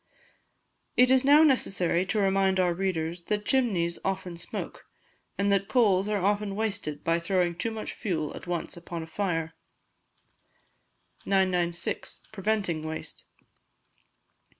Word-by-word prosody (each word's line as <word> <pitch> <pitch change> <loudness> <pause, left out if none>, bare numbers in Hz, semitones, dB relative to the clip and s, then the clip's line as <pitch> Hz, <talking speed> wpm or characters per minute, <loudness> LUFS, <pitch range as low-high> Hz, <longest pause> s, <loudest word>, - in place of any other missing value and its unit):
It 250 +1 +6
is 260 0 +5
now 290 +3 +7
necessary 190 - +2
to 215 - -1
remind 195 -1 +2
our 180 -1 +3
readers 170 -2 -2
that 210 -1 -1
chimneys 195 -11 +1
often 190 -2 -3
smoke, 170 - -7 0.5
and 200 0 +1
that 195 0 +2
coals 205 -6 +3
are 205 -3 0
often 205 0 0
wasted 200 -9 -2
by 165 +1 +2
throwing 175 0 +1
too 175 +7 -3
much 220 -1 -5
fuel 160 -7 -3
at - - -10
once 175 -1 -3
upon 170 -1 -6
a - - -7
fire. 165 -2 -2 1.7
996. 180 -3 0
Preventing 200 -5 -1
Waste. 160 0 -6
190 Hz, 125 wpm, -28 LUFS, 170-205 Hz, 1.7 s, now